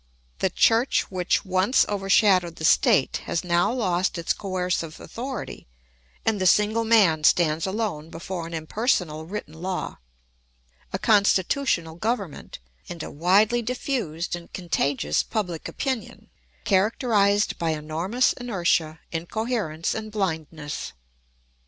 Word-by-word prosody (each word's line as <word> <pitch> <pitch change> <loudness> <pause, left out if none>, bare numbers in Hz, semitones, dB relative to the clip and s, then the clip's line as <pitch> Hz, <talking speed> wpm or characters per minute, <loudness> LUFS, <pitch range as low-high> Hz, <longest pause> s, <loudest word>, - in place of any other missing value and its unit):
The 190 - +2
church 225 +7 +2
which 185 +2 0
once 185 +6 +3
overshadowed 195 -3 +3
the 160 - -4
state 135 - +4
has 170 - -2
now 175 +3 +2
lost 185 -8 0
its 170 - 0
coercive 180 -4 -3
authority 250 - -6 0.6
and 215 -3 +1
the 185 - +3
single 210 +4 +3
man 200 -9 +4
stands 160 +1 +3
alone 190 -7 -3
before 170 +1 -6
an 170 - -9
impersonal 160 -2 -1
written 195 -4 -6
law, 180 +3 -4 0.9
a - - -1
constitutional 200 -3 +2
government, 210 - -3 0.3
and 170 -2 -6
a - - -7
widely 200 +9 +3
diffused 225 - -3
and 170 -1 -11
contagious 140 - 0
public 180 -7 -3
opinion, 260 -5 -4 0.3
characterised 205 0 +2
by 165 - 0
enormous 160 +10 0
inertia, 175 -9 0
incoherence, 175 -1 -2
and 215 -1 -5
blindness. 160 -7 -4
185 Hz, 115 wpm, -24 LUFS, 165-215 Hz, 0.9 s, state